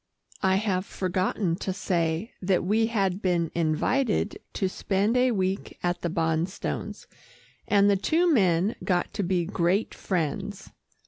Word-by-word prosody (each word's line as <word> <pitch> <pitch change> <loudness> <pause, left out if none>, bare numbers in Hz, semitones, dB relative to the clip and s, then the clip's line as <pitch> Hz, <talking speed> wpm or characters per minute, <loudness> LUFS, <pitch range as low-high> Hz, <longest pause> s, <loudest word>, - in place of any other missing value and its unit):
(I 190 -1 +3
have 195 -2 0
forgotten 185 -1 -1
to 190 - -3
say 175 +1 -1
that 185 -1 +1
we 220 +5 +2
had 195 -4 0
been 175 -3 +1
invited 205 - 0
to 190 - 0
spend 200 +4 0
a 250 +1 +4
week 190 -3 -2
at 175 0 -1
the 170 - -1
Bonstones, 165 +2 -2 0.6
and 200 0 +4
the 200 - +4
two 325 - +2
men 190 - +3
got 180 -2 0
to - - -2
be 180 -2 0
great 185 +3 0
friends.) 195 +3 -3
190 Hz, 140 wpm, -26 LUFS, 175-205 Hz, 0.6 s, a